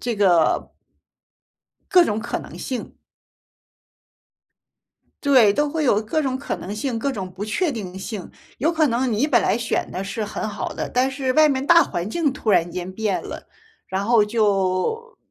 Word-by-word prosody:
这 240 Hz, -3 st, -2 dB
个 175 Hz, -5 st, +2 dB, 1.2 s
各 360 Hz, -2 st, +7 dB
种 210 Hz, -5 st, -1 dB
可 235 Hz, -, -3 dB
能 -, -, -11 dB
性。 255 Hz, -3 st, -5 dB, 2.3 s
对， 255 Hz, -8 st, +5 dB
都 295 Hz, +6 st, +1 dB
会 315 Hz, +1 st, -2 dB
有 210 Hz, -5 st, +3 dB
各 270 Hz, +9 st, -1 dB
种 260 Hz, -1 st, -1 dB
可 280 Hz, -, -4 dB
能 200 Hz, +3 st, -6 dB
性， 230 Hz, +1 st, -2 dB
各 280 Hz, +4 st, -1 dB
种 190 Hz, -6 st, -5 dB
不 190 Hz, +3 st, -6 dB
确 295 Hz, -, 0 dB
定 190 Hz, -5 st, -6 dB
性。 195 Hz, -2 st, -6 dB, 0.3 s
有 310 Hz, +7 st, +2 dB
可 315 Hz, -2 st, +2 dB
能 245 Hz, 0 st, 0 dB
你 235 Hz, +8 st, +1 dB
本 -, -, +3 dB
来 -, -, +2 dB
选 235 Hz, -2 st, -2 dB
的 190 Hz, -, -4 dB
是 215 Hz, +2 st, -3 dB
很 215 Hz, +1 st, -4 dB
好 205 Hz, -, -4 dB
的， -, -, -4 dB
但 255 Hz, +2 st, +1 dB
是 265 Hz, -1 st, -1 dB
外 310 Hz, +1 st, +5 dB
面 270 Hz, 0 st, -1 dB
大 335 Hz, 0 st, +7 dB
环 175 Hz, +3 st, -3 dB
境 295 Hz, +1 st, 0 dB
突 225 Hz, -, -2 dB
然 175 Hz, -3 st, +3 dB
间 180 Hz, +1 st, -5 dB
变 210 Hz, -1 st, -1 dB
了， -, -, -7 dB, 0.4 s
然 190 Hz, +1 st, -2 dB
后 225 Hz, -2 st, +4 dB
就 210 Hz, -, 0 dB
230 Hz, 190 characters per minute, -22 LUFS, 200-280 Hz, 2.3 s, 各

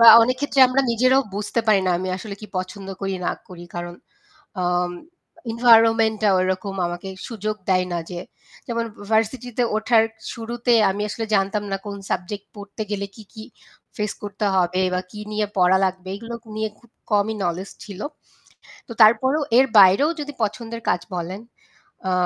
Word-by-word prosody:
বা 230 Hz, -, +8 dB, 0.2 s
অনেক 250 Hz, +2 st, +1 dB
ক্ষেত্রে 285 Hz, -1 st, +1 dB
আমরা 255 Hz, +2 st, +2 dB
নিজেরাও 255 Hz, +3 st, +4 dB
বুঝতে 210 Hz, +3 st, -1 dB
পারি 210 Hz, -3 st, +5 dB
না -, -, +3 dB
আমি 185 Hz, +1 st, -3 dB
আসলে 200 Hz, +1 st, -7 dB
কি 215 Hz, -, -8 dB
পছন্দ 190 Hz, +1 st, -6 dB
করি 195 Hz, -1 st, -2 dB
না -, -, +1 dB, 0.2 s
করি। 175 Hz, -1 st, -10 dB
কারণ 175 Hz, 0 st, -5 dB, 0.7 s
আ -, -, 0 dB, 0.9 s
এনভায়রনমেন্টটা 225 Hz, -2 st, +5 dB
ওরকম 185 Hz, +1 st, -1 dB
আমাকে 175 Hz, +2 st, -5 dB, 0.2 s
সুযোগ 215 Hz, -2 st, -3 dB
দেয় 185 Hz, -1 st, +3 dB
না 175 Hz, -, 0 dB
যে 175 Hz, -1 st, -5 dB, 0.5 s
যেমন 235 Hz, -1 st, -1 dB, 0.3 s
ভার্সিটি 225 Hz, +3 st, +1 dB
তে 245 Hz, -, +4 dB
ওঠার 220 Hz, +1 st, +4 dB, 0.3 s
শুরুতে 235 Hz, +1 st, 0 dB, 0.2 s
আমি 200 Hz, +2 st, -3 dB
আসলে 225 Hz, +1 st, -4 dB
জানতাম 200 Hz, +1 st, +1 dB
না -, -, +1 dB
কোন 200 Hz, -1 st, -5 dB
সাবজেক্ট 195 Hz, +3 st, -3 dB
পড়তে 205 Hz, +2 st, -7 dB
গেলে 200 Hz, -1 st, -2 dB
কি, 220 Hz, -, -12 dB
কি 220 Hz, -1 st, -8 dB, 0.5 s
ফেস 210 Hz, -1 st, -1 dB
করতে 205 Hz, 0 st, -3 dB
হবে 180 Hz, 0 st, +2 dB
বা 180 Hz, -, +1 dB
কি 210 Hz, -, -8 dB
নিয়ে 210 Hz, 0 st, 0 dB
পড়া 180 Hz, +1 st, +5 dB
লাগবে 185 Hz, 0 st, -3 dB
এগুলো 230 Hz, +3 st, -7 dB, 0.2 s
নিয়ে 220 Hz, 0 st, -1 dB
খুব 235 Hz, -, -23 dB, 0.2 s
কমই 210 Hz, +1 st, +2 dB
নলেজ 180 Hz, +3 st, -2 dB, 0.2 s
ছিল। 200 Hz, -2 st, -9 dB, 0.9 s
তো -, -, -6 dB
তারপরেও 260 Hz, +7 st, +5 dB, 0.2 s
এর 265 Hz, -, +6 dB
বাইরেও 200 Hz, -, +7 dB
যদি 290 Hz, 0 st, -5 dB
পছন্দের 225 Hz, +2 st, -3 dB
কাজ -, -, +2 dB, 0.2 s
বলেন 180 Hz, +3 st, -4 dB, 0.7 s
আ -, -, +1 dB
210 Hz, 165 wpm, -22 LUFS, 190-230 Hz, 0.9 s, বা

